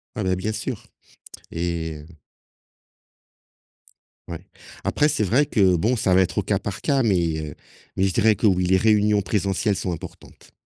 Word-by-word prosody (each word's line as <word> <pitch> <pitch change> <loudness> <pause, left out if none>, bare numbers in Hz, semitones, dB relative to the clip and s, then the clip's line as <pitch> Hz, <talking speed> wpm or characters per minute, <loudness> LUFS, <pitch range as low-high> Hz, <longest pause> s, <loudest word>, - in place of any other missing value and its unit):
Ah, 105 - -3
bah, 95 0 +1
bien 105 +4 -3
sûr 110 +1 -5 0.7
et 85 -2 -3
heu 80 - -16 2.1
Ouais. 85 -2 -8 0.4
Après, 150 - +2
c'est 110 - 0
vrai 125 +9 +2
que 95 -5 +3
bon, 110 +9 +1
ça 95 -4 +1
va 95 - +5
être 90 0 -1
au - - +1
cas 100 0 0
par 100 0 -6
cas 140 -3 +1
mais 85 -7 +1
heu, - - -13 0.4
mais 95 - +1
je 95 -2 +1
dirais 110 +1 +3
que, 110 - -2
oui, 90 -2 +2
les 95 +1 +3
réunions 105 -1 +3
présentielles 100 +1 0
sont 90 - -3
importantes. 85 - -10
95 Hz, 175 wpm, -23 LUFS, 90-110 Hz, 2.1 s, va